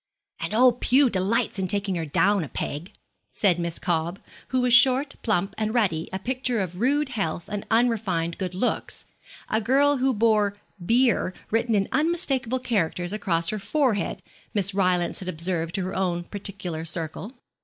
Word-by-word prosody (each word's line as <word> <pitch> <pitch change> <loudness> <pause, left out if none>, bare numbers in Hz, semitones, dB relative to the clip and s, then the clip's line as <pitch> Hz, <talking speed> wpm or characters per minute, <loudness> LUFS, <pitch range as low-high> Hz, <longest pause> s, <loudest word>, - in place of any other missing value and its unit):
'And - - -3
old 245 +1 +4
Pew 260 0 +4
delights 200 +3 0
in 190 - 0
taking 200 0 -1
her 165 -3 -3
down 200 +5 +2
a 145 - -7
peg,' 155 +6 -4 0.4
said 180 -4 +2
Miss 170 -1 -1
Cobb, 170 +1 -1 0.3
who 260 -1 0
was 250 -1 +2
short, 265 +2 +5
plump, 200 -3 0
and 215 +2 -1
ruddy, 180 -9 +1
a 190 - -2
picture 250 +2 -1
of 180 -2 -4
rude 280 +4 +1
health 175 -9 -3
and 205 -1 -5
unrefined 215 -8 +1
good 185 -2 -3
looks 220 +7 -2 0.4
a 220 - 0
girl 275 +5 +3
who 265 +1 +2
bore 210 -3 +2 0.3
'beer' 230 -3 +2 0.2
written 230 0 +1
in 195 -1 +1
unmistakable 270 -5 +1
characters 185 -7 -1
across 170 -5 0
her 215 - -2
forehead, 250 -2 0 0.3
Miss 200 -1 +2
Rylance 180 -3 +1
had 185 - -5
observed 170 0 -2
to 195 - -1
her 185 - -4
own 175 -2 -1
particular 185 -4 -5
circle. 165 - -4
200 Hz, 165 wpm, -25 LUFS, 180-245 Hz, 0.4 s, short